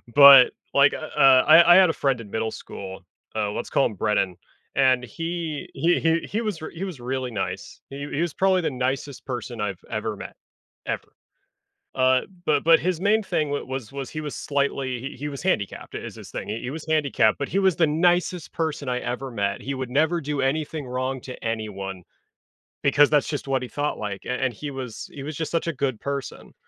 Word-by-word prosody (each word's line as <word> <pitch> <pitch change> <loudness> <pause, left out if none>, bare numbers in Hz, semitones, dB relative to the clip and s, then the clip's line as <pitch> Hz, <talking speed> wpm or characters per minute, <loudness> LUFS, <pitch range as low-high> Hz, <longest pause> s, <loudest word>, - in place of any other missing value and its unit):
but, 140 -3 +10 0.2
like, - - +6
u - - -3
uh, 130 -1 +5
I 170 +2 +9
I - - +8
had 185 -3 +7
a - - +1
friend 135 -5 0
in 105 - -11
middle 110 +1 -2
school, 95 -1 -8 0.3
uh, 105 -2 0
let's - - -4
call 140 - +3
him 110 - -8
Brennan, 95 -3 0 0.4
and 130 -2 +4
he 165 +1 -4
he 175 +2 +2
he 165 0 +2
he 220 +3 -2
wa 215 -2 0 0.2
he 170 +3 -6
was 180 -9 -5
really 130 0 -3
nice. 105 - -5
He 140 +1 -6
he 150 - 0
was 170 -3 -1
probably 190 -1 +3
the - - 0
nicest 130 +2 -3
person 120 -2 -5
I've 100 -3 -3
ever 110 -1 -3
met - - -9 0.5
ever. - - -4 0.9
Uh, 130 0 +4 0.2
but 145 -2 +2
but 165 0 +6
his 180 -1 -1
main 215 +2 +3
thing 155 -5 0
w 145 - -2
was 130 -2 -5
was 140 -1 -5
he 155 - -4
was 150 -2 -5
slightly 140 -3 -1
he 135 +3 -6
he 145 +3 -4
was 140 -2 -6
handicapped 110 - -2
i - - -1
is - - -7
his - - -11
thing. - - -5
He 110 +2 -4
he 125 - -4
was 155 +3 -6
handicapped, 140 -8 +2
but 140 - -3
he 195 - -1
was 190 -3 +3
the 165 -3 +3
nicest 175 +2 +1
person 155 -4 -2
I 125 0 0
ever 125 +2 -4
met, 100 -3 -2
he 140 - -3
would 130 -2 -4
never 160 +5 +2
do 145 -1 -2
anything 150 +1 -1
wrong 130 +1 -2
to 130 - -8
anyone 100 -5 -4 0.8
because 145 +1 +5
that's 150 -2 +3
just 145 -2 -4
what 135 -1 +1
he - - -5
thought 145 +1 -2
like, 105 -2 -5
a - - -3
and 130 - +1
he 145 +6 -6
was 130 -4 -7
he 140 - -7
was 155 0 -5
just 160 - -3
such 170 0 -1
a 165 - 0
good 130 -4 -2
person. 140 -1 -5
135 Hz, 220 wpm, -24 LUFS, 125-155 Hz, 0.9 s, but